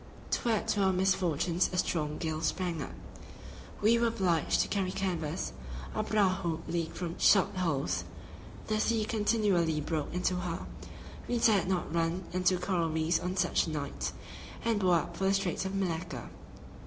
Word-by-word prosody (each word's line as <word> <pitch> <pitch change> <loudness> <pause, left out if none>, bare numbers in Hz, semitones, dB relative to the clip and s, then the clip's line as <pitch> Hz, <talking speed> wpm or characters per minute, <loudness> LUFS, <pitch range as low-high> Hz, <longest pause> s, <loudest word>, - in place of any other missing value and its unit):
To 240 - 0
add 220 -3 +1
to 205 - +2
our 190 -1 +4
misfortunes 180 -2 +1
a 180 - -3
strong 150 -4 0
gale 160 -1 -2
sprang 170 -1 -1
up. - - -6 0.9
We 230 +2 +5
were 235 - +3
obliged 185 -8 +2
to - - 0
carry 190 -3 -1
canvas; 175 -4 -2 0.4
our 215 - 0
prahu 185 -6 +1
leaked 170 -2 -2
from 175 -1 -4
shot 195 -2 +5
holes; 135 - 0 0.6
the 215 0 0
sea 220 -1 +1
continually 205 -8 +2
broke 150 0 -2
into 180 +1 0
her; 175 -1 -3 0.6
we 245 - 0
dared 215 -5 +4
not 185 -4 -1
run 170 +2 0
into 185 0 +3
the 180 - -6
coral 175 -4 +1
reefs 160 +1 +1
on 180 +2 -3
such - - +2
a - - -2
night, 145 -2 -3 0.5
and 230 -2 +2
bore 185 -3 +4
up 170 +1 -1
for 195 - -1
the 195 +1 +4
Straits 195 -1 -1
of 190 +1 -3
Malacca. 165 -9 -3
180 Hz, 170 wpm, -31 LUFS, 165-195 Hz, 0.9 s, We